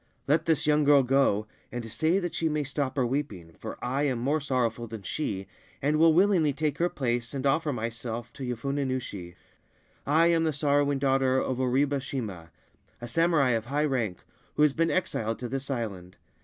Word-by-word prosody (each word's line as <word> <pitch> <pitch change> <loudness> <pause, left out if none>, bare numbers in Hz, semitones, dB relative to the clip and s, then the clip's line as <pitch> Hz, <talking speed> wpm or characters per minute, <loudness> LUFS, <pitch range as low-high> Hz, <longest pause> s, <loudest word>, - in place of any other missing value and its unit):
Let 155 +3 +2
this 160 -3 +1
young 150 0 +3
girl 145 -1 +6
go, 125 -5 +2 0.3
and 120 -1 -5
say 160 - +2
that 175 -3 -2
she 165 - 0
may 150 -1 0
stop 135 -1 -2
her 130 -3 +1
weeping, 110 - -3
for - - -6
I 130 +3 0
am 130 -3 0
more 140 +6 0
sorrowful 120 -4 -1
than 110 -2 -8
she, 100 - -3 0.3
and 150 +2 +1
will 165 0 +7
willingly 175 -4 +3
take 150 0 -2
her 175 +1 +2
place 120 -3 -2
and 135 0 -3
offer 150 +2 +2
myself 115 0 -4
to 135 - -8
Yofune 135 +3 -2
Nushi. 100 -9 -5 0.7
I 160 +4 +4
am 165 -1 +3
the 160 -1 +1
sorrowing 145 -1 +2
daughter 135 -1 +2
of 130 -1 -2
Oribe 135 +2 +1
Shima, 105 -12 -5 0.5
a 120 - -7
samurai 165 -2 +3
of 115 -1 -1
high 145 +3 +1
rank, 115 -10 -2 0.3
who 150 - +3
has 150 -2 +4
been 165 +2 +1
exiled 115 -11 -1
to 125 - -5
this 135 +3 -4
island. 100 -8 -4
135 Hz, 190 wpm, -28 LUFS, 120-150 Hz, 0.7 s, will